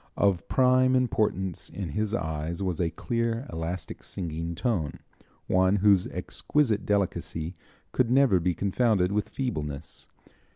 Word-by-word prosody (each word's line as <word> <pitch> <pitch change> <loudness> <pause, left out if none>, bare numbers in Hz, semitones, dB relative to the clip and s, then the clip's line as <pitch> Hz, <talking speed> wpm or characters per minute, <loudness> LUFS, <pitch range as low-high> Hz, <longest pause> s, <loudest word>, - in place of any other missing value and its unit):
Of 95 -4 +2
prime 130 0 +4
importance 105 -7 0
in 95 -4 -5
his 105 +7 -1
eyes 80 0 -3
was 90 -3 -1
a 85 - +1
clear, 115 - -2
elastic, 80 +2 -4
singing 85 -1 -4
tone, 85 - -1 0.5
one 95 +1 +3
whose 100 -2 +4
exquisite 125 -9 0
delicacy 90 -4 -1 0.4
could 125 -2 +2
never 125 -7 +5
be 85 0 0
confounded 100 -2 +2
with 105 +1 -1
feebleness. 75 - -4
95 Hz, 125 wpm, -27 LUFS, 85-115 Hz, 0.5 s, never